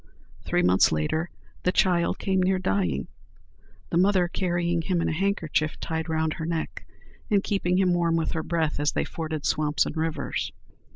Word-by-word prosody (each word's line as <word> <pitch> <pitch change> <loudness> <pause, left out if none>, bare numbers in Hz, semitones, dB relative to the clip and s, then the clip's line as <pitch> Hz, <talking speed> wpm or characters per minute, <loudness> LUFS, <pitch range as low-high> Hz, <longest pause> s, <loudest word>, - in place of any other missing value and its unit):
Three 90 - 0
months 90 +1 +5
later 155 - -1 0.3
the 180 - +2
child 175 -2 +2
came 190 -1 +1
near 185 +1 +2
dying, 95 - 0 0.8
the 170 - +3
mother 185 -1 +4
carrying 175 -2 0
him 175 +1 0
in - - 0
a - - 0
handkerchief 160 -4 0
tied 160 0 -3
round 160 -1 0
her 160 - -5
neck, 165 -1 -4 0.4
and 200 -3 +3
keeping 180 -3 0
him 185 -2 +3
warm 170 -1 +2
with 165 -1 0
her 160 - -1
breath, 160 -2 -1
as 145 0 +1
they - - 0
forded 155 -2 -4
swamps 150 -1 +2
and - - -5
rivers. 160 0 -2
165 Hz, 175 wpm, -26 LUFS, 155-180 Hz, 0.8 s, months